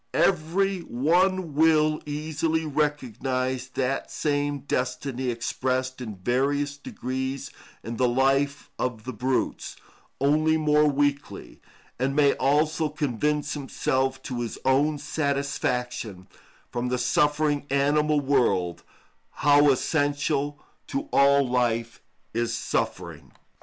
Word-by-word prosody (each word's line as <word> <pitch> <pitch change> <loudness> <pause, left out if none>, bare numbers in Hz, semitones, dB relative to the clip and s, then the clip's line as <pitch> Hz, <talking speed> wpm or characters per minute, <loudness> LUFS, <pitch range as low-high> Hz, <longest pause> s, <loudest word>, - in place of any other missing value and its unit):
Every 190 +3 +2
one 175 +5 +1
will 155 0 +3
easily 155 +2 -1
recognise 130 -3 -1
that 135 +1 -1
same 145 -1 -1
destiny 130 -1 -2
expressed 130 +2 -2
in 110 -4 -6
various 140 +8 0
degrees 130 -1 -4 0.3
in 115 0 -5
the 125 - +3
life 135 +3 +1
of 115 -4 -2
the 130 - -5
brutes, 125 +4 -2 0.4
only 155 +3 +3
more 150 -1 +3
weakly, 145 0 -1 0.4
and 135 +2 0
may 145 -2 +5
also 150 +3 +2
convince 150 0 -1
himself 130 -2 -1
to 125 -2 -4
his 115 - -4
own 145 +3 +3
satisfaction, 135 - -2 0.4
from 120 +1 -2
the 125 - 0
suffering 145 +3 +1
animal 145 +2 +2
world, 110 - +1 0.6
how 145 0 +6
essential 145 +1 0 0.3
to 285 +2 -4
all 140 0 +5
life 115 -2 0 0.3
is 120 0 -1
suffering. - - -3
140 Hz, 105 wpm, -26 LUFS, 130-150 Hz, 0.6 s, how